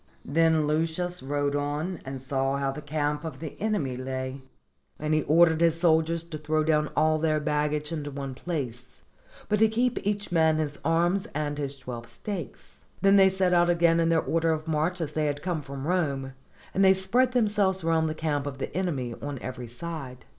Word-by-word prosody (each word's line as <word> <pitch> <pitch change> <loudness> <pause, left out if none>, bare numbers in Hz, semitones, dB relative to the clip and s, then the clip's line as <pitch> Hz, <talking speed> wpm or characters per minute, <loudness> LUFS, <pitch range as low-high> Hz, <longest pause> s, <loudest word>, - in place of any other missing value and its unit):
Then 160 +1 +3
Lucius 165 +4 -1
rode 145 +1 -1
on 150 +5 -2
and 135 0 -6
saw 135 +1 -1
how 140 -1 0
the 150 - -7
camp 150 0 -2
of 155 -5 -6
the 155 -2 -7
enemy 205 -12 0
lay; 130 +1 -4 0.6
and 155 +1 -1
he 155 - +3
ordered 160 +2 +4
his 165 -1 +3
soldiers 165 -1 +2
to 165 -2 -7
throw 155 0 0
down 150 -1 +2
all 155 0 +3
their 155 -1 +1
baggage 150 0 -1
into 150 -3 -3
one 135 -1 -5
place, 130 -5 -5 0.4
but 210 0 +1
to 220 - +6
keep 240 +3 0
each 205 -1 -2
man 160 -2 +3
his 150 -2 -2
arms 175 +4 +1
and 145 -1 -2
his 140 -1 -3
twelve 125 -3 -7
stakes. 175 - -8 0.2
Then 195 0 +6
they 195 -1 +7
set 190 -1 +1
out 175 0 +4
again 170 -1 +4
in 165 0 +2
their 165 -1 +3
order 165 0 +1
of 155 0 -2
march 160 +3 0
as 150 -2 -3
they 155 0 0
had 145 0 -3
come 175 -4 -1
from 140 -1 -7
Rome, 140 -6 -1 0.4
and 195 - +2
they 190 0 +7
spread 240 +7 +2
themselves 205 -6 +2
round 160 -1 +2
the 155 - -3
camp 145 -3 -1
of 135 -2 -5
the 135 - -5
enemy 145 -10 -1
on 145 -1 -4
every 125 -1 -6
side. 130 0 -7
155 Hz, 195 wpm, -27 LUFS, 145-170 Hz, 0.6 s, they